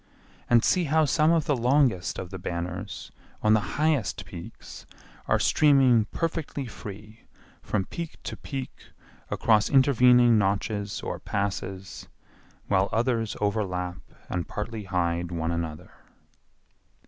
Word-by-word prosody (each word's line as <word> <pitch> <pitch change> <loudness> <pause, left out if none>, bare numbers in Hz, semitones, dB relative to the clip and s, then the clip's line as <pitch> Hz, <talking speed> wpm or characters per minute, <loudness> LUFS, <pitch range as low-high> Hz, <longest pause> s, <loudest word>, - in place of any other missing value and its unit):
And 120 -1 +5
see 180 -2 +2
how 155 +1 +3
some 155 +2 +3
of 165 -3 +2
the 145 - +2
longest 125 -6 +2
of 90 -1 -6
the 95 - -6
banners 90 +3 -5 0.3
on 110 0 +5
the 110 - +5 0.2
highest 145 - 0
peaks - - -10 0.4
are - - +3
streaming 135 -7 +4
perfectly 160 -1 -3
free 105 -1 -10 0.4
from 100 -3 -1
peak 170 - -6
to - - -5
peak 135 -3 -7 0.4
across 105 -2 +2
intervening 125 -4 +5
notches 100 +1 -1
or - - -4
passes, 95 -1 -4 0.6
while 95 0 +2
others 115 -2 0
overlap 95 -4 -1 0.3
and 90 -2 -3
partly 105 0 -5
hide 85 -2 -1
one 85 -1 -2
another. 85 +1 -4
110 Hz, 125 wpm, -26 LUFS, 95-130 Hz, 0.6 s, And